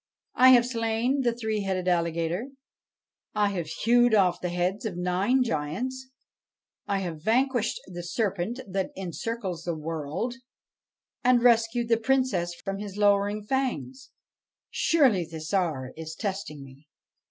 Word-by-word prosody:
I 255 +1 +7
have 240 -1 +6
slain 235 +2 0
the 240 -2 +2
three 220 -2 -2
headed 185 -2 -2
alligator; 170 +4 0 0.9
I 210 -1 +3
have 175 -5 -3
hewed 235 +7 +3
off 185 -4 +3
the 180 - -2
heads 180 +3 -1
of 205 -6 -4
nine 185 +9 +2
giants; 245 - -3 0.8
I 200 -1 0
have 165 -4 -5
vanquished 240 - +1
the 175 -1 -7
serpent 200 +5 -2
that 190 0 -2
encircles 190 0 -4
the 170 -2 -2
world, 160 - -3 0.9
and 245 -1 +4
rescued 235 0 +3
the 230 0 +3
Princess 225 -8 0
from 195 +3 -5
his 205 -1 -7
lowering 205 0 +2
fangs. 265 +1 -2 0.6
Surely 260 - +3
the 160 -1 -8
Tsar 155 -6 -1
is 160 0 -7
testing 190 -8 -4
me 135 +2 -16
200 Hz, 135 wpm, -27 LUFS, 175-235 Hz, 0.9 s, I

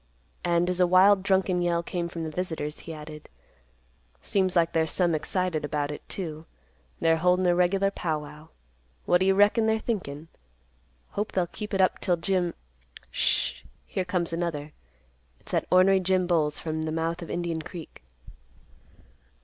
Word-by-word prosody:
And, 175 0 +2
as 180 0 -1
a 180 - +5
wild 190 +2 +6
drunken 190 -2 +1
yell 170 -1 +1
came 170 0 -3
from 170 -1 -5
the 160 - -4
visitors, 155 -3 -4
he 165 - -9
added, 150 -1 -9 0.9
"Seems 190 -2 0
like 170 -1 +3
they're 160 -1 +2
some 175 0 +1
excited 170 0 -1
about 145 0 -2
it, 150 - -7
too. 160 -4 -5 0.5
They're 165 0 +3
holdin' 180 +2 +2
a 175 - +4
regular 190 +3 +2
pow 160 -5 -2
wow. 150 +1 -12 0.6
What 175 - +4
do 190 - +2
you 195 - +4
reckon 210 +3 +4
they're 220 0 +3
thinkin'? 165 -10 -4 0.8
Hope 210 +2 -3
they'll 185 -2 +2
keep 210 +4 -8
it 195 -2 +2
up 185 - +2
'till 175 -1 +1
Jim—Sh—h—h 65 - -2 0.2
Here 190 - -2
comes 180 -2 -1
another. 165 -3 -3 0.7
It's - - -13
that - - 0
ornery 190 +1 +5
Jim 185 0 +1
Bowles 155 -4 +1
from 160 -1 -3
the 155 0 -2
mouth 165 +2 -2
of 170 - -8
Indian 170 -2 -2
Creek." 165 0 -10
175 Hz, 165 wpm, -27 LUFS, 160-185 Hz, 0.9 s, wild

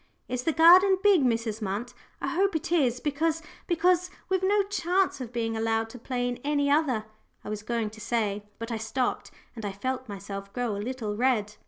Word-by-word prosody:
"Is 250 0 -2
the 325 - +3
garden 365 +5 +7
big, 395 -8 +5
Mrs. 230 -3 0
Munt? 210 +5 -3 0.3
I - - -2
hope 390 +1 +1
it 325 +2 -2
is, 255 -8 +2
because 315 +3 -1 0.2
because 360 +1 +2 0.2
we've 375 -1 +1
no 400 +2 +3
chance 375 -5 0
of 240 -2 -6
being 225 -2 -2
allowed 225 0 0
to 250 - -10
play 245 +1 -2
in 245 0 -3
any 285 -1 +1
other," 270 -8 +2 0.4
I - - -7
was 210 -1 -4
going 225 -1 -2
to 220 0 -12
say, 210 -3 -1
but 230 +1 -6
I 230 - -1
stopped, 235 +3 -2 0.3
and 225 - -7
I 205 - -2
felt 255 +4 -3
myself 200 0 -7
grow 245 -4 -1
a 200 - -4
little 225 -3 -3
red. 215 -3 +1
245 Hz, 200 wpm, -27 LUFS, 220-325 Hz, 0.4 s, garden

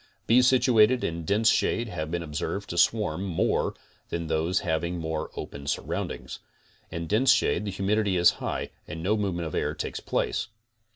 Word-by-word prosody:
Bees 125 +2 +5
situated 125 -2 +4
in 85 0 -3
dense 105 +4 +2
shade 115 - +1
have 80 -6 -4
been 85 0 -2
observed 80 +6 -4
to 85 - -5
swarm 105 -1 +2
more 90 -4 0 0.3
than 85 0 -3
those 80 +4 0
having 85 0 -1
more 80 -1 -3
open 70 0 -7
surroundings. - - -3 0.5
In 85 0 -4
dense 115 +10 +4
shade 105 - +2
the 100 - -2
humidity 100 0 +1
is 85 0 +6
high - - -3 0.2
and 85 -2 -6
no 105 +4 +2
movement 95 -5 -1
of 80 - -7
air - - -1
takes - - -4
place. - - -1
90 Hz, 170 wpm, -27 LUFS, 85-105 Hz, 0.5 s, is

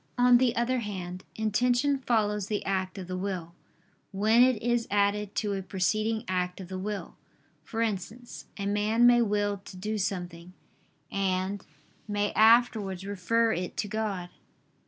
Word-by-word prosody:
On 245 0 +6
the 250 -2 +2
other 245 +2 +1
hand, 185 -4 -6
intention 245 +6 +1
follows 210 -5 0
the 210 -1 -2
act 190 0 -2
of 190 - -5
the 185 - -4
will, 185 -3 -4 0.6
when 215 +4 +4
it 255 -3 +4
is 240 -1 +1
added 205 0 +1
to 205 -2 -1
a 195 - -2
preceding 215 +4 -1
act 180 0 -1
of 185 -2 -8
the 185 -1 -5
will; 205 +1 -5 0.5
for 230 0 -2
instance, 225 +3 -5
a 200 - -3
man 210 +3 +2
may 240 0 +6
will 205 -2 0
to 185 - -10
do 210 +3 -3
something, 180 -2 -4 0.6
and 190 0 -1 0.4
may 205 0 0
afterwards 220 -4 +4
refer 220 +4 +1
it 180 +1 -4
to 210 - -1
God. 200 -4 -3
205 Hz, 155 wpm, -28 LUFS, 190-225 Hz, 0.6 s, On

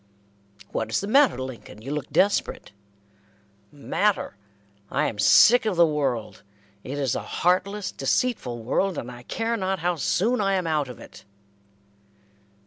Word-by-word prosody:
"What 110 - -2
is 110 - 0
the - - -4
matter, 270 +6 +4
Lincoln? 125 -4 -8
You 135 - -6
look 150 -2 -4
desperate." 200 - 0 1.0
"Matter! 190 - -1 0.5
I - - 0
am 105 - -4
sick 240 - +6
of 205 - 0
the 170 0 +6
world. 135 -8 -2 0.4
It 140 +3 -6
is 135 -4 0
a - - -2
heartless, 185 +2 -1
deceitful 135 - -1
world, 190 +10 0
and 125 - -5
I 120 0 -11
care 225 - -2
not 190 -3 -1
how 175 0 -1
soon 215 - +1
I 195 -1 +1
am 185 -2 -1
out 150 -4 0
of 125 - -10
it." - - -13
165 Hz, 150 wpm, -24 LUFS, 130-200 Hz, 1.0 s, sick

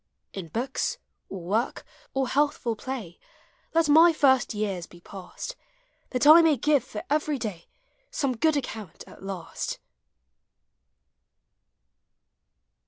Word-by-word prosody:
In 190 -4 -6
books, 245 - -2 0.3
or 190 - -6
work, 210 +8 -1 0.3
or 270 -1 +1
healthful 280 -4 0
piny. 225 -8 -6 0.6
Let 330 -1 +4
my 325 +3 +7
first 270 -5 +3
years 200 -5 -3
be 175 - -16
passed; 195 - -8 0.5
That 250 +1 0
I 315 +3 +10
may 320 -3 +4
give 290 +2 +2
for 210 - -7
every 300 0 0
day 210 -8 -6 0.4
Some 275 -4 -1
good 310 +5 +2
account 215 - -6
at - - -15
last. 190 -3 -5
250 Hz, 115 wpm, -26 LUFS, 195-295 Hz, 0.6 s, I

